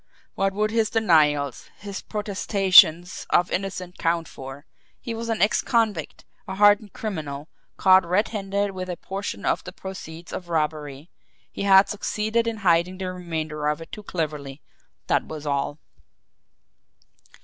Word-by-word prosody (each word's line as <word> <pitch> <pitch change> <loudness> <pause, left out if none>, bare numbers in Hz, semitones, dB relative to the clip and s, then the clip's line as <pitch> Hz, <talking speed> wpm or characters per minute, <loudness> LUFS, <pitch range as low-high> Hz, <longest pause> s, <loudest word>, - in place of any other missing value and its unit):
What 195 0 0
would 215 +1 0
his 225 -2 +1
denials, 150 - +2
his 200 -1 -7
protestations 190 -4 +3
of 175 +1 +2
innocence 185 -1 -4
count 165 -1 0
for? 135 +3 -10 0.3
He 235 - -5
was 230 +1 -5
an 225 -3 +1
ex 210 - +2
convict, 220 - -1 0.2
a 190 - -5
hardened 205 +1 +4
criminal 155 -8 -5 0.3
caught 190 -1 +6
red 185 +5 +1
handed 200 -1 -2
with 185 -1 -6
a 175 - -4
portion 200 +1 -5
of - - +1
the - - -8
proceeds 170 -3 -9
of 175 -2 -6
robbery 150 -2 -2 0.4
he - - -7
had 195 0 +6
succeeded 220 +2 -1
in 230 -1 -2
hiding 175 +1 +3
the 185 -1 -4
remainder 160 -4 -4
of 150 +1 0
it 165 - -11
too 210 - -7
cleverly, 150 -7 -4 0.4
that - - +1
was 155 -1 -7
all." 140 0 -1
185 Hz, 150 wpm, -24 LUFS, 155-205 Hz, 0.4 s, caught